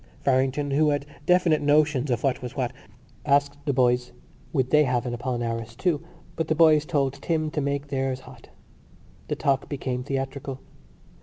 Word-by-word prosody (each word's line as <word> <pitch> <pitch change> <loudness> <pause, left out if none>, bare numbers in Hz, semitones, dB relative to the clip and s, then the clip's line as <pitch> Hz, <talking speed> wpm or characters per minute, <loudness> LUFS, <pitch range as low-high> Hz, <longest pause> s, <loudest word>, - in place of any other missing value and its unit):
Farrington, 135 +2 +1
who 150 +2 +3
had 145 -1 0 0.2
definite 180 -3 +4
notions 145 -2 +3
of 120 -2 0
what 135 -1 +1
was 125 -1 -7
what, 130 -2 -1 0.5
asked 140 0 +2
the - - +3
boys 125 -1 +2 0.4
would 130 -4 0
they 150 0 +6
have 125 -1 0
an 120 - -3
Apollinaris 115 -2 -3
too; 160 +1 0 0.3
but 160 - -2
the 155 - +1
boys 155 -2 +5
told 140 -5 +1
Tim 155 -1 -1
to 150 - -1
make 140 0 -2
theirs 135 -1 -1
hot. - - -15 0.8
The - - -1
talk 135 -1 0
became 130 -3 -3
theatrical. 135 0 -4
140 Hz, 165 wpm, -25 LUFS, 130-150 Hz, 0.8 s, they